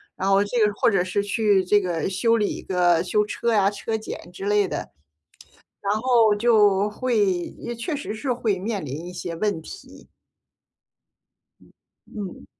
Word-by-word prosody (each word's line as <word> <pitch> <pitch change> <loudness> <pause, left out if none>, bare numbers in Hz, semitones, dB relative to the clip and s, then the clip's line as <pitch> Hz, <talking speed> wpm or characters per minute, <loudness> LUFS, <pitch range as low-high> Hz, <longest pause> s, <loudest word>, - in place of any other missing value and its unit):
然 190 - -3
后 195 +1 +4
这 205 +4 -3
个 210 - 0
或 205 - +2
者 195 -5 +2
是 185 +3 -1
去 205 -2 +2
这 205 +3 +3
个 175 -3 -2
修 210 +5 +2
理 210 -3 -1
个 175 -2 +2
修 210 +3 +1
车 235 +2 -1
呀， 200 -2 +4
车 215 +2 -4
检 215 -5 -7
之 195 - -7
类 205 -1 +2
的， - - -3 1.0
然 200 0 0
后 230 -3 +4
就 205 -2 +3
会 240 +1 -1 0.4
也 240 0 -5
确 235 +8 -4
实 285 -6 -4
是 250 +4 -3
会 225 -5 0
面 200 -2 -3
临 145 +5 -6
一 180 - -7
些 175 -1 -6
问 200 -1 -1
题。 390 - -12 2.0
嗯。 200 -5 -8
205 Hz, 175 characters per minute, -23 LUFS, 185-225 Hz, 2.0 s, 后